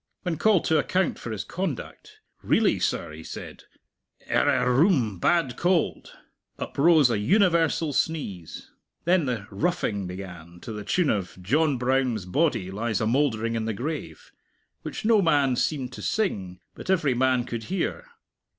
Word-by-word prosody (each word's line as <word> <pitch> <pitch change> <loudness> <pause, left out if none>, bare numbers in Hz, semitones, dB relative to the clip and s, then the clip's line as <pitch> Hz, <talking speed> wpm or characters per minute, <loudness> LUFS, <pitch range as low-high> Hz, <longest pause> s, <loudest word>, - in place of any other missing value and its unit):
When 175 -4 -2
called 210 0 +3
to 160 -1 +3
account 185 +5 0
for - - -7
his 105 -2 -4
conduct, 310 - -6 0.2
"Really, 205 - +2
sir," 90 - -1
he 80 +1 -10
said, - - -9 0.7
"er - - +3
er 125 +2 +3
oom 125 - +2
bad 155 - +2
cold!" 175 -2 0 0.4
Uprose 150 -3 +3
a 105 - 0
universal 165 - +2
sneeze. 105 - -3 0.3
Then 175 -2 +3
the 115 -6 -2
"roughing" 105 - -1
began, 90 -2 -9
to - - -7
the 105 -1 -6
tune 160 - +1
of 95 -4 -3
"John 145 - +1
Brown's 125 -5 0
body 115 - 0
lies 110 +3 -1
a 110 - 0
mouldering 115 -2 +1
in 115 -1 -2
the 110 -2 -2
grave" 125 - -6 0.5
which - - -6
no 220 -2 +5
man 145 -7 +3
seemed 130 -2 -1
to - - -8
sing, 95 - -2
but - - -10
every 165 -8 +2
man 130 0 +2
could 115 -1 -5
hear. 190 - -3
130 Hz, 155 wpm, -25 LUFS, 105-165 Hz, 0.7 s, no